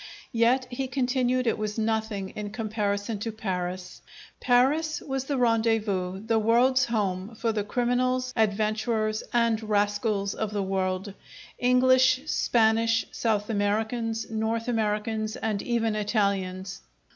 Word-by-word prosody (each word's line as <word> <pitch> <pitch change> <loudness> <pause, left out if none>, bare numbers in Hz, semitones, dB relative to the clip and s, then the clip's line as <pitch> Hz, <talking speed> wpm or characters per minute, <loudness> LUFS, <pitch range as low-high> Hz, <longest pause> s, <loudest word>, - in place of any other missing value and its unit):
Yet, 240 +3 +3
he 265 +2 -3
continued, 255 -1 0
it 225 - 0
was 215 0 -3
nothing 220 -3 -1
in 210 +1 -6
comparison 210 -1 -2
to 225 +2 -3
Paris. 185 -4 -4 0.4
Paris 280 +6 +2
was 270 -2 -4
the 280 0 -1
rendezvous, 220 -5 +1
the 225 -1 +2
world's 250 +4 +3
home, 205 -2 -2
for 225 +1 0
the 210 -2 -1
criminals, 255 +3 0
adventurers, 215 0 0
and 230 -2 +2
rascals 205 -1 0
if 220 - -3
the 205 -1 -2
world, 190 0 -2 0.5
English, 255 +1 +4
Spanish, 225 -4 +2
South 210 -3 0
Americans, 220 +2 -1
North 225 +1 -1
Americans, 215 -1 -1
and 215 -3 -2
even 225 -2 0
Italians! 200 - -1
220 Hz, 120 wpm, -26 LUFS, 205-240 Hz, 0.5 s, English